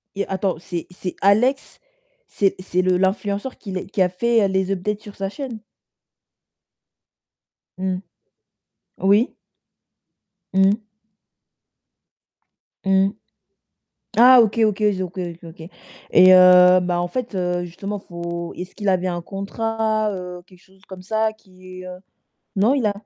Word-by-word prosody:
Et 200 - -2
attends, 190 -2 -2
c'est 175 -1 -6
c'est 180 0 -6
Alex 245 +8 +2 0.5
c'est 195 -2 0
c'est 185 -1 -1
le 185 0 +2
l'influenceur 200 +5 -1
qui 200 - -9
les 185 -1 -4
qui 195 -1 -2
a 180 - +4
fait 225 +3 +1
les 190 0 -1
updates 205 +3 -2
sur 205 - -12
sa 195 0 -3
chaîne? 250 -2 -7 2.2
Mmh, 185 0 -2 1.0
oui. 205 +6 +3 1.2
Mmh. 195 +3 +3 2.0
Mmh. 195 0 +3 1.1
Ah 250 +2 +8
OK, 225 0 +1
OK, 215 -1 0
ils 205 -3 +1
ont - - -2
OK, 185 +2 -12
OK, 175 -2 -5
OK. 165 0 -11 0.5
Et 185 0 +7
heu, 180 0 +7
bah, 175 -1 -1
en 175 - -2
fait, 245 +3 -5
heu, 180 -1 -1
justement, 195 +4 -6
faut 170 -1 -6
est-ce 180 +1 -8
qu'il 205 -2 -4
avait 185 -1 +1
un 175 -1 -3
contrat, 215 +2 -2
heu, 180 -1 -7
quelque 185 -1 -20
chose 190 0 -25
comme 185 -1 -10
ça 220 +2 0
qui, 185 -3 -14
heu 180 0 -9 0.6
non, 210 +7 +3
il 270 -4 0
a 205 - +2
190 Hz, 140 wpm, -21 LUFS, 180-210 Hz, 2.2 s, Ah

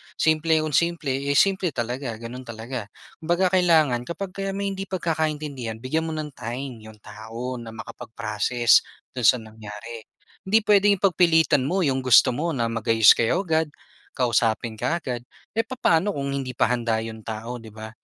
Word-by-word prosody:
Simple 160 0 +2
kung 155 - -3
simple, 170 -4 +1 0.2
eh, 140 - +1
simple 195 -2 +3
talaga, 120 +1 -3
gano'n 120 +3 -8
talaga. 115 -1 -6 0.3
Kumbaga 175 +3 +1
kailangan 155 -9 +3
kapag 185 +2 -5
kayo 195 0 -3
may 200 0 -2
hindi 195 0 -6
pagkakaintindihan, 155 -9 -2
bigyan 160 +5 -1
mo 160 - -4
ng 155 -1 -5
time 125 +1 -6
‘yong 110 -1 -14
tao 115 +4 -7
na 115 - -9
makapag-process 115 +1 +1 0.4
do'n 125 -3 +2
sa - - +7
nangyari. 110 +1 -10 0.4
Hindi 220 +3 +5
puwedeng 205 -1 +4
ipagpilitan 165 -7 +4
mo 185 +3 +1
‘yong 135 -1 +1
gusto 130 -2 +6
mo 165 +3 -1
na 120 -3 0
mag-ayos 115 -2 +5
kayo 170 - +1
agad, 160 -1 +1 0.5
kausapin 115 -2 +1
ka 170 +9 -1
agad. 120 -4 -4 0.3
Eh, 225 - +3
papaano 205 -6 +1
kung 140 -1 -3
hindi 135 -2 -3
pa - - +3
handa 115 -2 0
‘yon 110 -1 -8
tao, 115 +2 -5
‘di 110 - -10
ba? 110 0 -9
130 Hz, 165 wpm, -24 LUFS, 115-165 Hz, 0.5 s, sa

